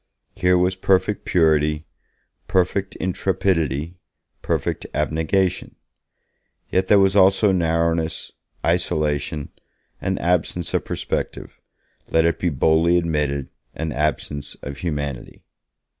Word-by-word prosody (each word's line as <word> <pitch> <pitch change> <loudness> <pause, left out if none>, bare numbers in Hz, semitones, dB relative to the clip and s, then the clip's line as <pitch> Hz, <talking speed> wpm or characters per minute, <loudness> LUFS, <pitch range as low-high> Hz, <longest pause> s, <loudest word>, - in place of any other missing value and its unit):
Here 90 -2 +3
was 90 +1 +2
perfect 95 +2 +1
purity, 75 -3 +2 0.6
perfect 95 +1 0
intrepidity, 85 -4 -1 0.4
perfect - - -2
abnegation; 85 +4 0 1.0
yet 95 0 +1
there 105 - +6
was 95 0 +4
also 95 +1 +5
narrowness, 85 -2 0 0.3
isolation, 75 -4 0 0.5
an - - -1
absence 90 0 -1
of - - 0
perspective, - - -4 0.5
let 80 0 +3
it 85 - +1
be 90 - +1
boldly 80 +4 +3
admitted, 75 -5 -1 0.3
an 80 0 -3
absence 75 0 -2
of 70 -1 -6
humanity. 70 -6 -4
85 Hz, 100 wpm, -22 LUFS, 75-90 Hz, 1.0 s, there